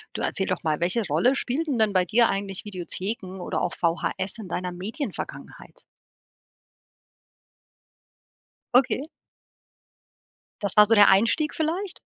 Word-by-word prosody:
Du - - -3
erzähl 190 - -1
doch 185 - -2
mal, 155 -2 0
welche 180 +6 0
Rolle 250 +8 +2
spielten 275 +2 -1
denn 220 -2 +3
bei 185 -2 +2
dir 230 +5 +3
eigentlich 195 -1 -3
Videotheken 190 0 -5
oder - - -2
auch 175 - -1
VHS 175 +3 -1
in 200 - -7
deiner 180 +1 -3
Medienvergangenheit? 215 - -7 2.9
Okay. 260 +2 +3 1.6
Das 200 -3 -1
war 210 - +9
so 225 +2 +3
der 205 -1 +7
Einstieg 230 +10 +3
vielleicht? 350 +5 -2
205 Hz, 125 wpm, -25 LUFS, 185-245 Hz, 2.9 s, war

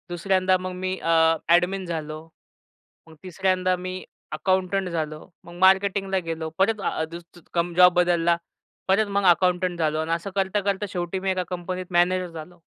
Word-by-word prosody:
दुसऱ्यांदा 185 +1 +1
मग 185 0 -5
मी 185 +1 -3
अ, 165 - 0 0.4
ॲडमिन 180 +3 +3
झालो. 155 -2 -5 0.8
मग 160 - -15
तिसऱ्यांदा 185 0 0
मी 185 +1 -6 0.3
अकाउंटंट 190 0 0
झालो. 155 -2 -4 0.2
मग 170 0 -12
मार्केटिंगला 190 +1 +3
गेलो. 160 -1 -3
परत 205 +2 +1
अ, 160 - -1
दूस 170 +1 -8 0.3
कम 170 0 0
जॉब 180 0 +7
बदलला. 175 -1 +2 0.5
परत 200 +3 +3
मग 200 - +1
अकाउंटंट 180 0 +2
झालो 155 -1 0
आणि 160 +1 -2
असं 170 +4 -2
करता-करता 200 +1 0
शेवटी 175 +1 -3
मी 190 0 -1
एका 185 -1 -1
कंपनीत 180 0 -5
मॅनेजर 180 +1 +2
झालो. 165 +2 -10
180 Hz, 155 wpm, -24 LUFS, 170-190 Hz, 0.8 s, जॉब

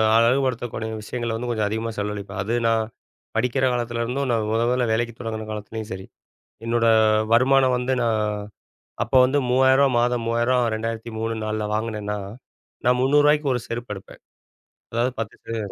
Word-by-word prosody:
அழகுபடுத்தக்கூடிய 120 -2 +1
விஷயங்கள 120 +2 -4
வந்து 120 +1 -4
கொஞ்சம் 110 -3 0
அதிகமா 110 +2 -2
செலவழிப்பேன். 105 -1 -4
அது 115 +4 -1
நான் 115 -1 +2 0.5
படிக்கிற 125 +3 +1
காலத்துலேருந்தும், 120 +3 -2
நான் 110 -2 0
முதல் 115 +1 +2
முதல்ல 125 -2 +1
வேலைக்கு 115 0 -1
தொடங்கின 110 -2 -5
காலத்திலேயும் 110 +1 -6
சரி. 95 0 -7 0.6
என்னோட 115 0 +2 0.5
வருமானம் 130 +1 +4
வந்து 130 +1 0
நான் 115 -2 +1 0.8
அப்ப 120 - -13
வந்து 140 +3 +1
3000ரூபா 130 +2 +5
மாதம் 120 -1 +1
3000 120 +1 +2
2003 115 0 -3
4 110 0 -2
வாங்கினேன்னா, 105 -2 -3 0.7
நான் 125 0 +4
300ரூபாய்க்கு 145 +1 +4
ஒரு 125 - -2
செருப்பு 115 -2 -4
எடுப்பேன். 95 - -13 0.7
அதாவது 120 +3 +1
10% 110 -1 -5
115 Hz, 135 wpm, -23 LUFS, 110-125 Hz, 0.8 s, 3000ரூபா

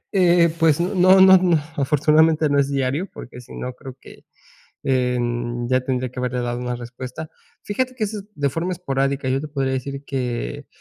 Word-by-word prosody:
Eh, 175 -3 +4
pues, 165 -1 +3
no 185 +1 +4
no 190 0 +9
no, 175 -3 +3 0.2
afortunadamente, 155 +2 +3
no 145 -1 +2
es 140 0 +1
diario, 140 +6 -1
porque 125 - -10
si 125 - -13
no, 125 0 -5
creo 130 -1 -11
que, - - -15 0.6
em, 120 -2 -1
ya 130 0 +3
tendría 130 -1 -2
que 125 - -7
haberle 125 0 -2
dado 120 0 -3
una 125 0 -3
respuesta. 125 +5 -8 0.3
Fíjate 255 +5 -2
que 225 -4 -2
eso 210 +1 -4
es 200 - -11
de 140 -1 0
forma 165 +6 -2
esporádica. 140 -5 -2
Yo 135 - +1
te 155 - -6
podría 135 -2 -2
decir 140 +2 -4
que, 125 - -4
140 Hz, 190 wpm, -21 LUFS, 125-165 Hz, 0.6 s, no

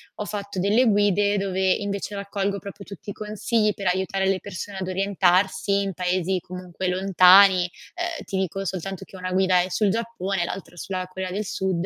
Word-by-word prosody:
ho 210 - -4
fatto 200 -2 -5
delle 210 +7 +3
guide 205 -1 +3
dove 190 -1 0
invece 200 0 -4
raccolgo 200 0 -2
proprio 200 0 -9
tutti 200 +1 -9
i - - -7
consigli 215 0 0
per 195 -2 -4
aiutare 190 +1 0
le 195 -1 +1
persone 200 0 -7
ad 185 - -4
orientarsi 190 0 +2
in 195 -1 -3
paesi 185 +1 0
comunque 180 0 -6
lontani. 185 0 +6 0.5
Uhm, - - -8
ti 190 - -3
dico 190 +1 -2
soltanto 190 0 -4
che - - -15
una 185 0 -5
guida 185 -1 +3
è 185 - -3
sul 210 +2 +1
Giappone 200 -4 -2
e - - +1
l'altra 185 -1 -7
sulla 185 0 -4
Corea 185 0 -5
del 205 +2 -3
Sud. 185 -2 -1
190 Hz, 185 wpm, -24 LUFS, 185-200 Hz, 0.5 s, lontani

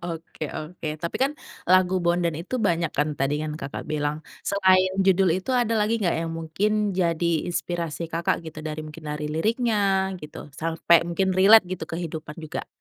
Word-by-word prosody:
Oke 165 -2 -6
oke. 160 +2 -7 0.2
Tapi 170 - -2
kan 275 +2 +2 0.4
lagu 185 0 +5
Bondan 170 -1 +1
itu 180 +9 -6
banyak 170 -3 +1
kan 150 +1 +2
tadi 135 +2 +1
yang 155 - -3
Kakak 140 - -6
bilang. 150 -1 -1 0.3
Selain 185 -1 +4
judul 190 -1 +4
itu 190 +7 -4
ada 240 -3 +2
lagi 220 +2 +1
gak 180 -4 +1
yang 165 0 -3
mungkin 205 +6 0
jadi 170 -2 +1 0.2
inspirasi 170 -2 -3
Kakak 165 0 0
gitu, 160 -1 -8
dari 155 0 -4
mungkin 155 +1 -10
dari 150 0 -4
liriknya 200 +1 +1
gitu, 150 0 -9 0.2
sampai 165 +1 +3
mungkin 190 +2 +1
relate 200 +3 +8
gitu 185 -3 -4
kehidupan 160 -2 -6
juga? 155 -2 -5
170 Hz, 170 wpm, -25 LUFS, 160-190 Hz, 0.4 s, relate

